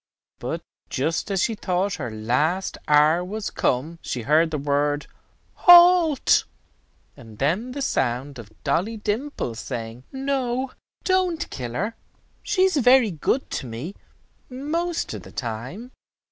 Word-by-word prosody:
But - - -4 0.3
just 160 +9 -1
as 195 -2 +1
she 230 - +1
thought 190 -1 -1
her 130 -5 -4
last 130 - 0
hour 150 +3 +5
was 205 +3 -4
come, 155 +7 -1
she 125 - -4
heard, 155 +6 +3
the 155 - -2
word 145 +1 0 0.5
"Halt," 350 -4 +6 0.7
and 115 -5 -13
then 185 - 0
the 280 0 -3
sound 130 - -1
of 110 -2 -11
Dolly 220 +6 0
Dimple 215 - -3
saying, 115 0 -6
"No, 265 -1 -1 0.3
don't 370 -3 +1
kill 120 -3 -5
her. 210 - -2 0.5
She 395 -3 +1
is 375 -4 +3
very 250 -4 +5
good 180 - -1
to 130 - -3
me 120 +11 -6 0.6
most 320 +6 -2
of - - -6
the - - -13
time." 130 - -6
180 Hz, 135 wpm, -24 LUFS, -, 0.7 s, Halt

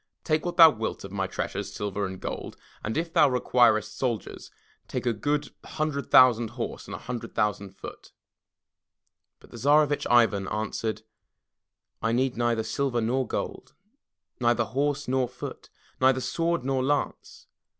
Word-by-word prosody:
Take 155 +1 0
what 175 - -4
thou 165 -2 +10
wilt 110 -4 -4
of 100 - -8
my 95 -1 -2
treasures, 100 +1 -4
silver 100 -1 -3
and 95 0 -8
gold, - - -6 0.3
and 110 - -3
if 165 +1 -2
thou - - +5
requirest 120 -4 +2
soldiers, 120 -5 -3 0.4
take - - -4
a 120 - +2
himdred 145 +2 -3
thousand 120 -2 +6
horse 120 +1 -6
and - - -6
a - - -5
hundred 120 -2 -7
thousand 100 -2 -1
foot.*' - - -10 1.3
But - - -19
the - - -9
Tsarevitch 145 +2 +3
Ivan 110 -5 +4
answered: 110 +1 -3 1.0
"I 115 0 0
need 130 +1 +1
neither 120 -1 0
silver 120 +3 -1
nor 125 +3 0
gold, - - -5 0.6
neither 120 0 +2
horse 140 +3 -1
nor 130 0 +1
foot, 125 - -8 0.3
neither 130 0 +4
sword 165 +2 -1
nor 135 -1 0
lance. 145 +1 -2
120 Hz, 150 wpm, -27 LUFS, 110-140 Hz, 1.3 s, thou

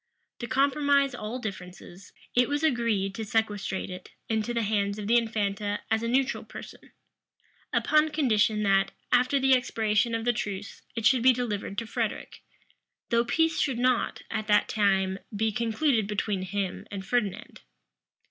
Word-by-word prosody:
To 240 - -4
compromise 280 +1 +2
all 225 +1 -5
differences, 185 -4 -8 0.2
it 250 +2 +3
was 290 +1 -1
agreed 230 -9 +1
to 220 - -5
sequestrate 205 -3 -1
it 180 - -9 0.2
into 220 +1 0
the 235 -1 0
hands 200 -1 0
of 210 - -5
the 230 +3 +3
infanta 205 -3 0
as 220 0 +2
a 230 - -2
neutral 260 +3 +1
person; - - -11 0.8
upon 310 0 +3
condition 220 -8 +2
that, 195 -1 +2 0.2
after 255 +3 +3
the 265 0 +4
expiration 225 -2 +1
of 225 0 -3
the 245 - +3
truce, 205 -3 -5
it 230 -2 -3
should 250 +1 +5
be 255 +1 +6
delivered 210 -5 -3
to 230 - -2
Frederic; 220 - -4 0.7
though 235 0 +3
peace 325 +6 +1
should 265 -5 0
not, 250 0 +1
at 215 -1 -3
that 210 -1 +4
time, 195 -2 +1 0.2
be 220 +1 +1
concluded 230 0 +1
between 210 -2 -1
him 190 0 -3
and 195 -1 -6
Ferdinand. 210 -4 -2
220 Hz, 155 wpm, -27 LUFS, 205-250 Hz, 0.8 s, be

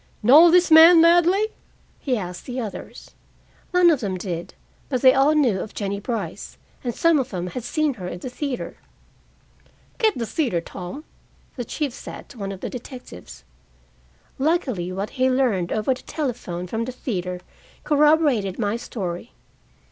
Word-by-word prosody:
"Know 300 +10 +8
this 355 0 +4
man 325 +2 +9
Ladley?" 350 +5 +4 0.5
he 255 -4 -1
asked 180 -3 -7
the 255 0 -4
others. 220 -4 -8 0.6
None 360 -2 +5
of 300 - +1
them 195 -6 -3
did, 175 -2 -6 0.3
but 255 -3 -2
they 260 -1 +8
all 280 +3 +3
knew 245 -11 +2
of 215 - -7
Jennie 200 -1 -3
Brice, 230 +2 -5 0.3
and 240 -2 -3
some 335 -3 +3
of 265 -1 -2
them 180 -3 -4
had 225 +7 -6
seen 305 +2 0
her 185 -7 -7
in 180 - -5
the 180 - -7
theater. 275 0 -5 1.2
"Get 440 -4 +2
the 235 - -2
theater, 240 - -1
Tom," 180 - -8 0.5
the 245 - -4
chief 280 +3 -3
said - - -10
to 250 - -14
one 195 -1 -4
of 190 -1 -9
the - - -3
detectives. 160 - -10 1.0
Luckily, 260 - 0
what 195 +3 -4
he 260 -1 +1
learned 240 -10 +1
over 215 +5 +1
the 255 - -11
telephone 240 - -4
from 225 +5 -3
the 255 - -5
theater 180 -8 -4 0.4
corroborated 295 - +3
my 215 0 -1
story. 190 -3 -6
245 Hz, 165 wpm, -23 LUFS, 195-295 Hz, 1.2 s, man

